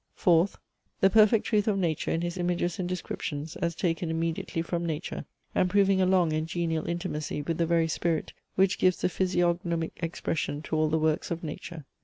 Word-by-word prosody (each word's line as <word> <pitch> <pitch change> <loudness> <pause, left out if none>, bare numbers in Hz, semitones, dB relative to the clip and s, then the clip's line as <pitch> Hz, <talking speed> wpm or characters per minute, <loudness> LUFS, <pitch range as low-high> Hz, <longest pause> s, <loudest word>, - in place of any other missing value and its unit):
Fourth; 175 +2 +3 0.4
the 195 - +5
perfect 215 +1 +5
truth 210 -2 +1
of 205 -2 +2
nature 165 -5 0
in 165 - 0
his 175 0 -2
images 175 -1 -1
and 180 -1 -2
descriptions 160 -4 -4
as 170 -1 -1
taken 170 -1 -1
immediately 165 0 -2
from 170 0 -2
nature, 160 0 -4 0.3
and 180 - +2
proving 195 0 +4
a 185 - +3
long 180 -4 +3
and 155 +1 -1
genial 165 -2 -1
intimacy 160 -4 -3
with 165 +2 -2
the 165 - +2
very 165 -1 +3
spirit 165 0 -1 0.2
which 190 0 +3
gives 185 -1 +3
the - - +2
physiognomic 175 -2 0
expression 165 -3 -2
to 160 - -3
all 155 0 +2
the 160 - +2
works 155 -1 0
of 170 0 -3
nature. 155 0 -7
170 Hz, 190 wpm, -28 LUFS, 160-180 Hz, 0.4 s, the